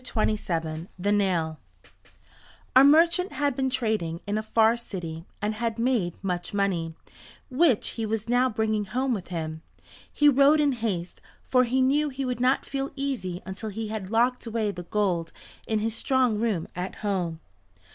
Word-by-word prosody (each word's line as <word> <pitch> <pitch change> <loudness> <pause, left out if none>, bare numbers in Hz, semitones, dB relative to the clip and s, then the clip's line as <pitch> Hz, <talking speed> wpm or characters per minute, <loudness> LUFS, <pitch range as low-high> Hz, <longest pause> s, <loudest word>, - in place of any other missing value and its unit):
THE 180 -5 -2
NAIL 175 -6 +1 1.2
A 260 - +9
merchant 335 +6 +5
had 285 -3 0
been 265 0 0
trading 215 -10 -1
in 205 0 -2
a 215 - 0
far 220 +1 +3
city 175 -8 -7 0.2
and 210 +1 0
had 225 +1 -2
made 230 -8 0
much 180 +1 -3
money, 175 -5 0 0.6
which 260 -4 +3
he 225 -2 -4
was 220 0 -2
now 245 +2 +3
bringing 215 -2 0
home 255 +6 -1
with 195 -6 -4
him. 160 -2 -4 0.5
He 295 - +3
rode 285 +2 +6
in 295 -1 +3
haste, 210 -8 -3 0.2
for 255 -1 +3
he 255 +2 +1
knew 290 +3 +2
he 270 0 -4
would 250 -2 -2
not 255 +2 +2
feel 275 0 -3
easy 255 -11 -3
until 190 +4 -5
he 220 +1 -5
had 210 -4 -5
locked 240 +2 +1
away 220 -2 -1
the 180 - -7
gold 180 -6 0 0.4
in 220 - +1
his 220 +1 -1
strong 250 -2 +1
room 215 -8 0
at 180 +2 -4
home. 180 -5 -1
220 Hz, 165 wpm, -26 LUFS, 185-255 Hz, 1.2 s, A